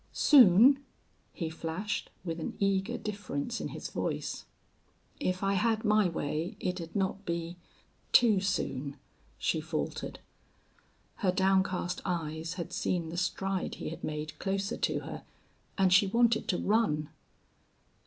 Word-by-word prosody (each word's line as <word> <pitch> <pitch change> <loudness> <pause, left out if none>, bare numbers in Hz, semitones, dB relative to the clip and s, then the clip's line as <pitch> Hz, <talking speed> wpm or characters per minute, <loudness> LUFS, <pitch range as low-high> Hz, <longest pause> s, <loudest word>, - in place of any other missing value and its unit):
"Soon?" 265 +1 +7 0.5
he 165 - -4
flashed, 165 +6 -3 0.2
with 165 -1 -3
an 160 - -5
eager 195 -1 +1
difference 205 -1 -4
in - - -2
his - - -6
voice. - - -3 0.7
"If 185 -8 -1
I 195 0 +2
had 220 +3 +1
my 210 -3 +4
way 160 +1 -3
it'd 180 -2 -4
not 195 0 -1
be 170 -1 -3 0.6
too 225 -5 +6
soon," 150 -7 -2 0.4
she - - 0
faltered. - - -4 1.0
Her 185 - +2
downcast 190 -1 +1
eyes 165 -1 -3
had 170 -3 -5
seen 170 -3 -1
the 165 - -6
stride 190 +1 -1
he - - -5
had 165 - -8
made 150 0 -4
closer 195 +2 -1
to - - 0
her, - - -7 0.5
and 190 -2 +4
she 195 +2 +6
wanted 230 +2 +2
to 180 - +1
run. 195 -9 +1
185 Hz, 135 wpm, -30 LUFS, 165-205 Hz, 1.0 s, Soon